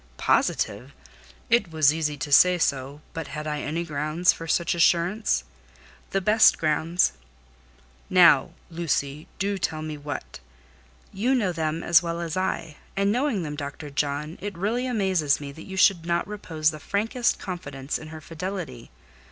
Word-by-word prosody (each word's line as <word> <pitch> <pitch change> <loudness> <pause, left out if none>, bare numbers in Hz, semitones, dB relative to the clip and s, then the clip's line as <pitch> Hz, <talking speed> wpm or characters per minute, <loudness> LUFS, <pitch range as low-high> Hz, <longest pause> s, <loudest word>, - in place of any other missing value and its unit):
"Positive! 125 +7 0 0.5
It 230 -5 +3
was 155 -2 +4
easy 150 -2 -2
to 145 +2 -5
say 180 +5 +6
so, 140 -2 -1
but 165 -1 -5
had 150 0 -6
I 150 -1 -2
any 165 +3 -2
grounds 155 +2 +1
for 165 - -8
such 170 +2 +1
assurance?" 175 - +2 0.7
"The 195 - 0
best 215 +3 +5
grounds." 160 +3 +1 1.0
"Now, - - +6 0.2
Lucy, 155 -3 -2
do 200 0 -1
tell 155 -3 -2
me 155 -1 -5
what!" 145 0 -6 0.7
"You 245 +7 +1
know 205 -8 +1
them 160 -1 -2
as 170 -1 +5
well 170 -1 -3
as 170 -2 -4
I; 185 -5 -2 0.2
and, 200 0 +2
knowing 245 -5 0
them, 150 -2 -5
Dr. 145 0 -7
John, 145 +3 -2
it 200 -2 -5
really 230 +7 -1
amazes 190 - +1
me 140 -1 -7
that 160 +3 -12
you 190 0 -7
should 190 -3 +4
not 170 0 -1
repose 165 -7 -1
the 155 - -9
frankest 225 - 0
confidence 145 -7 -5
in 155 - -10
her 155 0 -9
fidelity. 165 -6 -6
165 Hz, 160 wpm, -25 LUFS, 150-190 Hz, 1.0 s, say